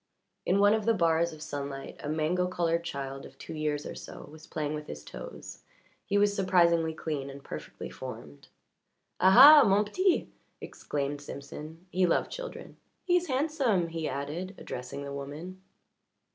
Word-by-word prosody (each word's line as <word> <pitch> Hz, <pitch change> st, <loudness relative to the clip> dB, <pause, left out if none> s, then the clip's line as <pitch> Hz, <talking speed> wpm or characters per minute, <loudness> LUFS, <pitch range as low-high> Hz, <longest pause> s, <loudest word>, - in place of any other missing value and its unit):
In 185 Hz, -, +3 dB
one 205 Hz, +1 st, +5 dB
of 220 Hz, -1 st, 0 dB
the 230 Hz, -, +4 dB
bars 170 Hz, -2 st, +2 dB
of 155 Hz, -1 st, -9 dB
sunlight 140 Hz, -2 st, -5 dB
a 145 Hz, -, -3 dB
mango 160 Hz, +4 st, +1 dB
coloured 170 Hz, -2 st, 0 dB
child 135 Hz, -3 st, -5 dB
of -, -, -13 dB
two 165 Hz, -, -8 dB
years 150 Hz, -1 st, -2 dB
or -, -, -5 dB
so -, -, -10 dB
was 155 Hz, 0 st, -13 dB
playing 150 Hz, -1 st, -3 dB
with 150 Hz, 0 st, -6 dB
his 75 Hz, 0 st, -8 dB
toes -, -, -9 dB, 0.5 s
he 205 Hz, -, +2 dB
was 205 Hz, 0 st, +3 dB
surprisingly 170 Hz, -4 st, +3 dB
clean 150 Hz, -3 st, -4 dB
and 140 Hz, 0 st, -10 dB
perfectly 75 Hz, 0 st, -7 dB
formed. 70 Hz, -1 st, -9 dB, 0.7 s
"Aha, 270 Hz, +10 st, +10 dB
mon 205 Hz, +1 st, +3 dB
petit!" 370 Hz, -, +1 dB, 0.3 s
exclaimed 145 Hz, 0 st, -4 dB
Simpson. 150 Hz, +4 st, -9 dB
He 185 Hz, 0 st, +3 dB
loved 170 Hz, -, +1 dB
children. -, -, -8 dB, 0.3 s
"He 355 Hz, -1 st, +2 dB
is 355 Hz, 0 st, +1 dB
handsome," 260 Hz, -, +1 dB
he 165 Hz, -1 st, -3 dB
added, 155 Hz, +8 st, -4 dB
addressing 125 Hz, +3 st, -6 dB
the 140 Hz, 0 st, -6 dB
woman. 150 Hz, +7 st, -7 dB
165 Hz, 160 wpm, -29 LUFS, 145-195 Hz, 0.7 s, Aha